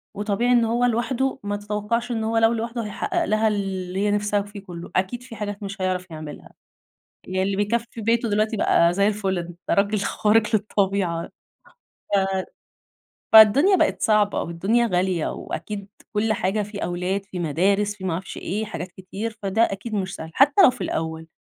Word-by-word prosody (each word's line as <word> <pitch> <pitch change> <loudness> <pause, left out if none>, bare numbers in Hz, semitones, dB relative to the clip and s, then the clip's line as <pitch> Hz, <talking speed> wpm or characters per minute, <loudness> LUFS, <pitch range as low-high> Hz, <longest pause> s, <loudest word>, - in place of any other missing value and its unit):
وطبيعي 210 +4 0
إن 240 -2 +4
هو 235 +2 +1
لوحده 245 +3 0
ما 205 0 -2
تتوقعش 210 +4 -2
إن 225 -2 -1
هو 225 +1 0
لو 225 +1 +4
لوحده 235 +1 -3
هيحقق 350 - -2
لها 215 +1 +2
اللي 190 -3 -2
هي 205 +1 +1
نفْسها 205 0 +1
في 205 +1 -9
كلّه، 175 -3 -9
أكيد 215 +7 -1
في 245 -3 -10
حاجات 205 -1 -5
مش 195 0 -6
هيعرف 185 -1 -2
يعملها 155 -2 -8 0.8
يعني 185 0 -1
اللي 195 0 0
بيكفي 230 +3 -1
بيته 230 +1 +1
دلوقتي 215 +2 +1
بقى 170 -3 +3
زي 200 +2 +2
الفل 195 -4 -1
ده 175 0 -10 0.2
راجل 200 +2 +2
خارق 210 +2 +2
للطبيعة 195 -5 0 0.9
ف - - +5 1.2
فالدنيا 250 - +8
بقت 320 -4 +1
صعبة، 210 -2 +2
والدنيا 200 +8 +1
غالية، 180 -4 0
وأكيد 200 +4 -5 0.3
كل 220 +1 +1
حاجة 195 +1 0
في 205 0 -6
أولاد 180 +3 -2
في 190 -2 -7
مدارس 195 +6 +1
في 190 - -12
ما 185 -3 -1
أعرفش 185 +4 -6
إيه 210 +5 -3
حاجات 195 -4 -5
كتير، 195 +5 -6
فده 195 +3 +1
أكيد 215 0 0
مش 190 -3 -2
سهل 160 0 -8
حتّى 285 - +5
لو - - +9
في 250 -1 -7
الأوّل، 160 0 -3
205 Hz, 175 wpm, -23 LUFS, 190-225 Hz, 1.2 s, لو